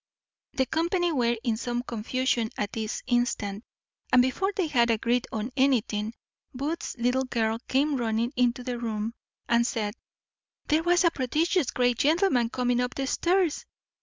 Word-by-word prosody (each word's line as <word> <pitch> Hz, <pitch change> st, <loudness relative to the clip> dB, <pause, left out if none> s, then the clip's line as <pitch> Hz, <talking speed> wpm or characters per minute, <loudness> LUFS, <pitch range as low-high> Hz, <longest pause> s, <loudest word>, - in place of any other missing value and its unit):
The 265 Hz, -, +1 dB
company 345 Hz, +4 st, 0 dB
were 240 Hz, -5 st, +1 dB
in 230 Hz, -3 st, 0 dB
some 240 Hz, +1 st, -2 dB
confusion 240 Hz, 0 st, -1 dB
at 205 Hz, -1 st, -2 dB
this 220 Hz, -1 st, -3 dB
instant, 240 Hz, -4 st, 0 dB, 0.5 s
and 255 Hz, -, +6 dB
before 260 Hz, +11 st, +2 dB
they 375 Hz, -, +1 dB
had 240 Hz, -6 st, +2 dB
agreed 235 Hz, +2 st, +1 dB
on 220 Hz, +3 st, -3 dB
anything, 230 Hz, -5 st, +1 dB, 0.4 s
Booth's 290 Hz, +3 st, -3 dB
little 250 Hz, +2 st, +1 dB
girl 225 Hz, -2 st, 0 dB
came 280 Hz, +2 st, +2 dB
running 230 Hz, +1 st, -1 dB
into 245 Hz, 0 st, +1 dB
the 245 Hz, -1 st, -3 dB
room, 225 Hz, -1 st, -3 dB, 0.3 s
and 235 Hz, 0 st, +3 dB
said, 210 Hz, -4 st, -2 dB, 0.7 s
"There 310 Hz, +1 st, +2 dB
was 350 Hz, +2 st, +3 dB
a 340 Hz, -, +4 dB
prodigious 300 Hz, +3 st, 0 dB
great 245 Hz, -2 st, +1 dB
gentleman 295 Hz, -, +3 dB
coming 245 Hz, 0 st, 0 dB
up 250 Hz, +2 st, -2 dB
stairs." 350 Hz, +3 st, +1 dB
245 Hz, 150 wpm, -27 LUFS, 230-285 Hz, 0.7 s, and